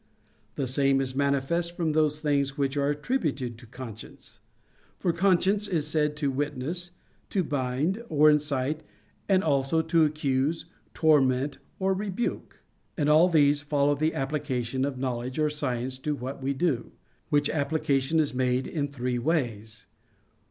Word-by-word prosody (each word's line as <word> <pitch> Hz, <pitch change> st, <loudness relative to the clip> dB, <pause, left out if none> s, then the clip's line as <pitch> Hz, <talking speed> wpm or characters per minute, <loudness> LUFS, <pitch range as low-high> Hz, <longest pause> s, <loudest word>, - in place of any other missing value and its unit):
The 140 Hz, -, -1 dB
same 135 Hz, +1 st, +2 dB
is 130 Hz, -1 st, -1 dB
manifest 140 Hz, +5 st, 0 dB
from 165 Hz, -3 st, 0 dB
those 155 Hz, -1 st, +1 dB
things 140 Hz, -2 st, 0 dB
which 140 Hz, -1 st, 0 dB
are 140 Hz, 0 st, +1 dB
attributed 145 Hz, -, -1 dB
to 120 Hz, -, -14 dB
conscience. 115 Hz, -2 st, -10 dB, 0.6 s
For 175 Hz, -, 0 dB
conscience 195 Hz, +3 st, +2 dB
is 165 Hz, -6 st, -1 dB
said 150 Hz, -1 st, 0 dB
to 145 Hz, -2 st, 0 dB
witness, 145 Hz, +5 st, -2 dB, 0.4 s
to 190 Hz, -, +1 dB
bind, 145 Hz, -, -1 dB
or 150 Hz, 0 st, +5 dB
incite, 150 Hz, -1 st, +1 dB, 0.5 s
and 190 Hz, -1 st, +4 dB
also 145 Hz, +1 st, +1 dB
to 165 Hz, 0 st, +3 dB
accuse, 150 Hz, 0 st, 0 dB, 0.3 s
torment, 140 Hz, -3 st, +3 dB, 0.2 s
or 190 Hz, 0 st, +1 dB
rebuke. 200 Hz, +3 st, -4 dB, 0.3 s
And 150 Hz, -3 st, +1 dB
all 160 Hz, +4 st, +6 dB
these 145 Hz, -3 st, +4 dB
follow 145 Hz, 0 st, +2 dB
the 155 Hz, +3 st, 0 dB
application 135 Hz, -3 st, -1 dB
of 140 Hz, -2 st, -3 dB
knowledge 125 Hz, -1 st, -3 dB
or 155 Hz, -1 st, +2 dB
science 130 Hz, -3 st, -3 dB
to 150 Hz, +2 st, -2 dB
what 135 Hz, +1 st, -6 dB
we 135 Hz, +1 st, -1 dB
do: 135 Hz, -6 st, -1 dB, 0.4 s
which 145 Hz, -1 st, +3 dB
application 145 Hz, 0 st, 0 dB
is 150 Hz, -5 st, +1 dB
made 125 Hz, 0 st, +1 dB
in 145 Hz, -3 st, -2 dB
three 125 Hz, -3 st, -2 dB
ways. 115 Hz, -8 st, -2 dB
145 Hz, 145 wpm, -27 LUFS, 130-155 Hz, 0.6 s, all